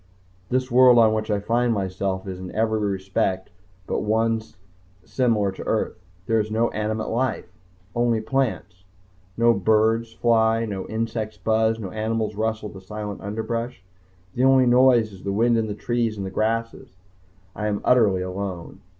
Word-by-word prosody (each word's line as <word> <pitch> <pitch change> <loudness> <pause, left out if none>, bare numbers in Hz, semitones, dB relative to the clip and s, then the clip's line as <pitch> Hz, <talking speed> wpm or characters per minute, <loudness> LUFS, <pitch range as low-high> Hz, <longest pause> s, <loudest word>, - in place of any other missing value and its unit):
This 130 0 -1
world 125 0 +7
on 110 -2 +5
which 110 0 -2
I 105 -1 +1
find 120 +3 +1
myself 95 -2 -2
is 95 -1 -6
in 95 -1 -7
every 110 0 +1
respect 95 -2 -1 0.3
but - - -2
one 110 +1 +1 0.6
similar 110 -6 +1
to 95 - -9
Earth. - - -1 0.2
There 115 +2 +2
is 105 0 -1
no 115 +2 +1
animate 110 +1 -2
life 115 -6 -2 0.4
only 120 -1 +1
plants. 110 -7 -2 0.5
No 115 0 +5
birds 110 +3 +2
fly, 115 0 +2
no 100 -3 -5
insects 110 -1 -3
buzz, 110 0 +1
no 100 -5 -6
animals 110 0 -2
rustle 110 0 -2
the 95 - -11
silent 105 +1 -6
underbrush. 115 +1 -4 0.5
The 125 - 0
only 130 -1 +5
noise 120 -3 +4
is 95 - -12
the 100 - -3
wind 115 +4 +2
in 115 -1 0
the 105 - -4
trees 115 -1 -1
and 95 -1 -5
grasses. 115 -2 -2 0.6
I 105 - -2
am 105 -1 -1
utterly 105 -7 +3
alone. 95 -2 -6
110 Hz, 160 wpm, -23 LUFS, 100-115 Hz, 0.6 s, world